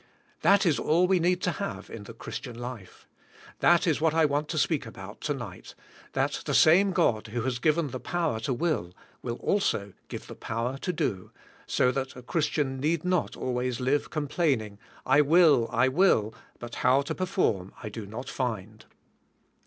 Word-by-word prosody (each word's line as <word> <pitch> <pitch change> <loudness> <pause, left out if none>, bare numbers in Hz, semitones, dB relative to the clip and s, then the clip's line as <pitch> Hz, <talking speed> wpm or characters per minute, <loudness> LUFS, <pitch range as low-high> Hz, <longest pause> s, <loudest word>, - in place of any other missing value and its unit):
That 200 +1 +5
is 165 -4 +2
all 170 +4 +3
we 185 0 +3
need 180 +1 +1
to 180 - +2
have 200 +3 -5
in 105 -2 -8
the - - -9
Christian 120 -2 -7
life. 120 -6 -8 0.5
That 175 0 +4
is 160 -4 +1
what 160 -1 +2
I 165 -1 +5
want 145 +1 0
to 160 - -3
speak 145 -4 +1
about 100 -2 -10
to 145 - -1
nig^ht, 120 -3 -9 0.4
that - - 0
the - - 0
same 185 +6 +6
God 110 -10 +1
who 115 +2 -3
has 125 -1 -1
g'iven 155 0 +1
the 130 - -5
power 165 -9 -1
to 135 +5 -3
will, 120 - -1 0.3
will 120 -1 -3
also 115 - 0 0.2
g - - -4
ive - - -13
the - - -9
power 120 +4 -3
to 180 - -2
do, 105 - -2 0.4
so 125 - +2
that 135 0 -3
a 125 - -10
Christian 145 -3 -1
need 155 +4 0
not 180 -1 0
always 125 -1 -2
live 135 +3 0
complaining", 140 - -1 0.3
I 145 +3 +5
will, 150 -6 +5
I 120 +2 +3
will, 130 - +3 0.2
but 120 0 -9
how 130 +3 +4
to - - -3
perform, 180 - -1
I 105 - -4
do 105 -1 -7
not 115 +6 -7
find. 110 -4 -4
135 Hz, 185 wpm, -27 LUFS, 115-165 Hz, 0.5 s, same